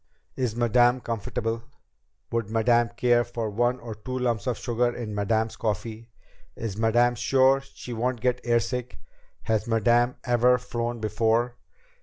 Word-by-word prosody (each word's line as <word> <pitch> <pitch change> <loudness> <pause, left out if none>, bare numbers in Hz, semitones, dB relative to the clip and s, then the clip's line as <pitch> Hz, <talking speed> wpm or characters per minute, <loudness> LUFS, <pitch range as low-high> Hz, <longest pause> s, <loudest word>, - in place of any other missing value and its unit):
"Is 125 -4 -1
Madame 120 +1 +3
comfortable?" 115 0 -3 0.7
"Would 115 -3 -1
Madame 115 +1 +3
care 120 -1 +3
for 115 -2 -4
one 120 +4 +1
or 115 -2 -7
two 130 +5 -6
lumps 120 -4 -1
of 125 - 0
sugar 120 0 0
in 115 -3 -5
Madame's 110 +2 0
coffee?" 110 +2 -3 0.5
"Is 110 -4 -4
Madame 120 +3 +3
sure 135 +3 +3
she 125 - -7
won't 120 +2 -1
get 125 +1 0
airsick?" 120 +1 -1 0.5
"Has 110 0 0
Madame 120 +2 +3
ever 125 0 +4
flown 120 -1 -4
before?" 115 +3 +1
120 Hz, 140 wpm, -26 LUFS, 110-125 Hz, 0.7 s, ever